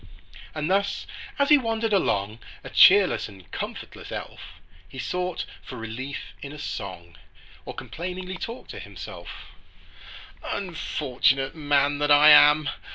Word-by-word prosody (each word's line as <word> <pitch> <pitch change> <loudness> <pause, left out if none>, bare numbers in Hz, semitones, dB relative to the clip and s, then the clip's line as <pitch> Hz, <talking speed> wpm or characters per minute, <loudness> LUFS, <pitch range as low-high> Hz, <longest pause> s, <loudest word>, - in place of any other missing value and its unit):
And 155 -1 -2
thus 200 +2 0 0.3
as 280 0 +2
he 295 -1 +7
wandered 225 -2 -1
along, 105 - 0 0.2
A - - -9
cheerless 190 - +6
and 95 -2 -16
comfortless - - -7
elf, - - -8 0.4
He - - -12
sought 180 +8 -3 0.2
for 130 - -10
relief 115 +5 -6
in 140 - -7
a 150 - -9
song, 85 - -7 0.5
Or - - -7
complainingly 185 +2 -6
talked 230 +5 -7
to - - -8
himself:— - - -10 0.9
"Unfortunate 135 -7 -1
man 145 -2 +1
that 145 0 0
I 145 +1 +8
am! 150 0 +7
150 Hz, 130 wpm, -25 LUFS, 130-185 Hz, 0.9 s, I